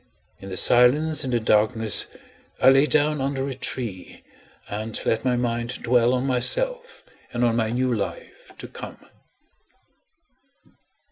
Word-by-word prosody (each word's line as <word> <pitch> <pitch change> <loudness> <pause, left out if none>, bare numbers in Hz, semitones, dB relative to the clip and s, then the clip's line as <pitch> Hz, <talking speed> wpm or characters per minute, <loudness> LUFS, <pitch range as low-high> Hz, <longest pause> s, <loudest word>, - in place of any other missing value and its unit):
In 95 - -10
the 95 - -5
silence 145 - +3
and 130 - -3
the 120 - +1
darkness 110 -1 +2 0.5
I 130 - +6
lay 135 +2 +4
down 150 -1 +1
under 135 0 -2
a 135 - -4
tree, 115 -7 -5 0.4
and 110 +2 -5
let 115 0 0
my 125 -1 +1
mind 120 0 -3
dwell 120 +1 +3
on 125 +1 -2
myself 485 - -1 0.3
and 120 0 0
on 115 -1 +1
my 115 -1 0
new 125 +2 0
life - - -6
to - - -7
come. - - -10
125 Hz, 140 wpm, -23 LUFS, 115-135 Hz, 0.5 s, I